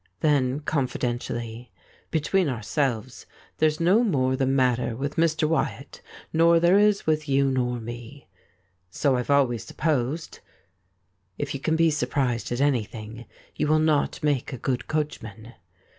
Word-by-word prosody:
Then, 145 -3 +2
confidentially: 120 -4 -3 0.2
' - - -32
Between 175 +2 +1
ourselves, 125 0 -2 0.3
there's 155 -1 +2
no 185 +8 +4
more 130 - +1
the 130 0 0
matter 125 -3 +1
with 140 +4 -4
Mr. 160 -1 +2
Wyatt 160 +1 -2 0.3
nor 165 +1 +5
there 175 +4 +5
is 210 -1 +3
with 155 -1 0
you 135 0 +3
nor 125 -2 -1
me.' 120 +4 -9 0.6
'So 130 +8 +1
I've 125 +1 -3
always 130 -6 +2
supposed.' 150 +1 -2 1.0
If - - -3
you 140 - -4
can 160 +3 0
be 165 0 +3
surprised 130 -5 -1
^^at 120 - -3
anything 115 -4 -2 0.3
you - - 0
will 155 +1 +4
not 155 -2 +1
make 145 -4 0
a 130 - -5
good 125 +1 -2
coachman. 115 -7 -4
140 Hz, 145 wpm, -25 LUFS, 120-155 Hz, 1.0 s, nor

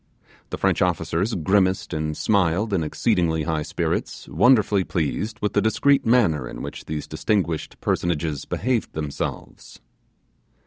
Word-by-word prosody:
The - - -4
French - - +1
officers 95 +8 0
grimaced 95 +2 +1
and 75 -1 -2
smiled 100 +1 +1
in 85 -4 +1
exceedingly 80 +1 0
high 80 0 -1
spirits, - - -3
wonderfully 105 - +4
pleased 105 +7 -2
with 105 - -1
the 105 - +3
discreet 135 +5 +2
manner 105 -11 +3
in - - -7
which - - -7
these 75 -1 -4
distinguished 90 -7 -2
personages 80 -4 -1
behaved 125 -3 -1
themselves. 75 -2 -6
90 Hz, 130 wpm, -23 LUFS, 80-105 Hz, -, wonderfully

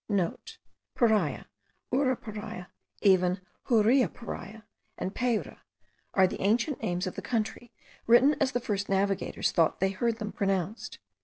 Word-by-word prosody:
(* - - -26
Paria, 215 - +2 0.5
Uraparia, 220 -8 -2 0.3
even 185 -2 +4 0.3
Huriaparia 230 -2 +1 0.3
and 190 - -3
Payra, 240 -3 -1 0.6
are 190 - +6
the 185 - -3
ancient 235 +8 +1
names 180 -3 -1
of 185 - -4
the - - -6
country, 230 +1 -3 0.4
written 255 +6 +6
as 265 -1 +2
the 245 - +1
first 205 -4 -3
navigators 195 0 0
thought 165 -3 +2
they 190 +1 +2
heard 230 +4 -1
them 210 -2 -4
pronounced. 195 +2 -2
215 Hz, 130 wpm, -29 LUFS, 190-240 Hz, 0.6 s, are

